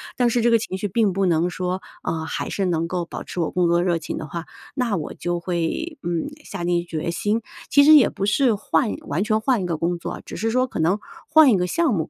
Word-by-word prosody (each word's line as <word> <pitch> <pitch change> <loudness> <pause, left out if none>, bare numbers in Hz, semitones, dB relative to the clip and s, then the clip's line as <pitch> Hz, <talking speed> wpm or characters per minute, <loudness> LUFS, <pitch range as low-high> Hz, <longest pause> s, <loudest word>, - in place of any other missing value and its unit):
但 245 - +2
是 240 - +1
这 235 - +3
个 230 - +5
情 215 -4 -4
绪 205 - -1
并 205 0 +1
不 195 0 +1
能 170 0 +2
说， 180 +1 -3 0.2
呃， 160 -1 -3
还 - - -4
是 195 - -1
能 165 -2 0
够 175 -1 -2
保 - - -7
持 - - -7
我 165 - 0
工 180 -1 +2
作 170 +1 +3
热 175 -2 +1
情 160 - -5
的 160 - -5
话， 165 +2 -6 0.3
那 245 -6 0
我 150 - -5
就 175 0 -3
会， 180 - -3
嗯， 170 -1 -2 0.2
下 175 - -6
定 175 0 +1
决 170 -1 -3
心。 210 +5 0 0.3
其 285 - +6
实 310 +2 +8
也 285 - +7
不 195 - -3
是 230 +2 +3
换 220 +3 0
完 155 +6 -1
全 215 0 +1
换 235 -6 +1
个 170 -2 -1
工 170 +2 -1
作， - - -6
只 - - -7
是 225 +1 -1
说 255 +2 +2
可 - - -6
能 175 +6 +2 0.3
换 310 -3 +7
一 205 - +4
个 180 0 0
项 315 - +1
目， 160 -4 -2
185 Hz, 275 characters per minute, -22 LUFS, 170-225 Hz, 0.3 s, 实